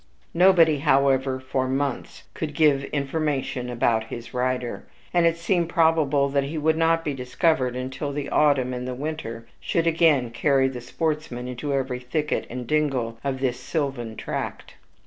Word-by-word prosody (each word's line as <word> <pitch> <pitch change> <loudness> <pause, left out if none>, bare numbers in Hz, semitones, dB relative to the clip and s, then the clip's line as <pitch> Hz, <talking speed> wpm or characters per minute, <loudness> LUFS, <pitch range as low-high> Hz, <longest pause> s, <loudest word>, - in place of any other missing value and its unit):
Nobody, 170 -4 +5
however, 135 -2 +2
for 130 0 -2
months 135 0 -3
could 155 -2 -5
give 145 -4 +3
information 140 -3 -2
about 115 -2 +1
his 115 +1 -8
rider; 125 -1 -2 0.3
and 175 -1 +4
it 165 0 +1
seemed 170 0 0
probable 160 -5 +3
that 140 0 +1
he 155 +3 -4
would 155 +1 +2
not 165 0 +2
be 145 - -1
discovered 130 0 0
until 130 +3 -4
the 140 0 -4
autumn 140 -4 +3
and 125 0 -4
the 125 - -3
winter 125 -6 -5
should 165 - 0
again 160 -7 +3
carry 135 +2 +2
the 130 -2 -5
sportsman 150 -3 -3
into 125 +3 -4
every 130 -2 -1
thicket 150 +5 -2
and 125 +1 -5
dingle 130 -5 0
of 135 -1 -2
this 125 -2 0
sylvan 135 -8 -3
tract. - - -5
140 Hz, 160 wpm, -24 LUFS, 125-155 Hz, 0.3 s, Nobody